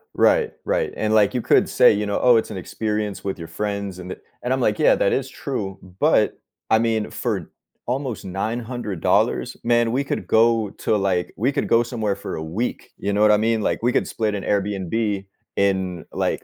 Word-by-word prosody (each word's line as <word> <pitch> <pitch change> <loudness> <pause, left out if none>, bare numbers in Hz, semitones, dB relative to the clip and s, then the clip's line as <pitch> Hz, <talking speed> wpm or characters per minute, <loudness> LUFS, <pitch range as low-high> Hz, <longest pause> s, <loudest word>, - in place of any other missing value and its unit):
Right, 465 -3 +3
right. - - 0
And, 110 - 0
like, 105 -2 +4
you 125 - 0
could - - +3
say, - - +6
you 105 +1 -1
know, 100 0 -1
"Oh, 125 -1 +6
it's 110 - +1
an 100 - -5
experience 105 +1 -3
with 95 -1 -3
your 85 - -8
friends, 100 -2 -4
and 90 +1 -6
i" - - -9 0.3
and 125 - -2
I'm 130 - 0
like, 105 -3 +1
"Yeah, - - +5
that 100 - +1
is 130 -1 -1
true, 100 -11 -4 0.2
but, - - +3 0.3
I 110 - +5
mean, 115 -2 0
for - - -3 0.3
almost 125 -2 -3
$900, 105 - -1
man, 120 -1 +2
we 135 +4 +1
could - - -4
go 115 -1 +3
to, 110 - -1
like 95 -3 0
we 125 +7 +1
could - - -1
go 115 - +4
somewhere 110 -4 -2
for 100 - -6
a 80 - -4
week, 100 +10 -4
you 100 - -2
know 105 - +1
what 105 0 +6
I 105 - +5
mean? 110 +1 +1
Like, - - -1
we 120 - +3
could - - +1
split 110 -2 -1
an 100 - -4
Airbnb 100 0 -1 0.3
in, 95 -3 0
like, - - -1
105 Hz, 210 wpm, -22 LUFS, 100-120 Hz, 0.3 s, say